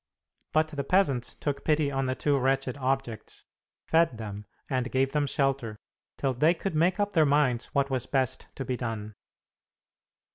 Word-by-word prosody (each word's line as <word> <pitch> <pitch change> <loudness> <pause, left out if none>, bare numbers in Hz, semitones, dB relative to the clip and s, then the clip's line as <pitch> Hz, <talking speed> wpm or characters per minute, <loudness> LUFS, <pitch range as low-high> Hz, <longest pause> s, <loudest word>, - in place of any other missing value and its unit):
But 155 0 +2
the 145 -3 -3
peasants 140 -7 +1
took 140 -2 -3
pity 150 -2 +2
on 135 -1 -1
the 130 - 0
two 145 +1 +1
wretched 135 -1 +1
objects, 135 -4 -3 0.4
fed 165 -7 +3
them 105 -2 -7 0.2
and 130 -2 -1
gave 135 +1 +2
them 150 -1 +1
shelter, 135 -6 0 0.4
till 135 -2 0
they 155 +8 +3
could 190 +2 -3
make 175 +5 +2
up 205 0 +1
their 160 -5 +4
minds 140 -5 +2
what 140 -1 0
was 130 -1 -1
best 130 -1 0
to 135 - -4
be 130 - -1
done. 110 -3 -4
135 Hz, 170 wpm, -28 LUFS, 125-150 Hz, 0.4 s, their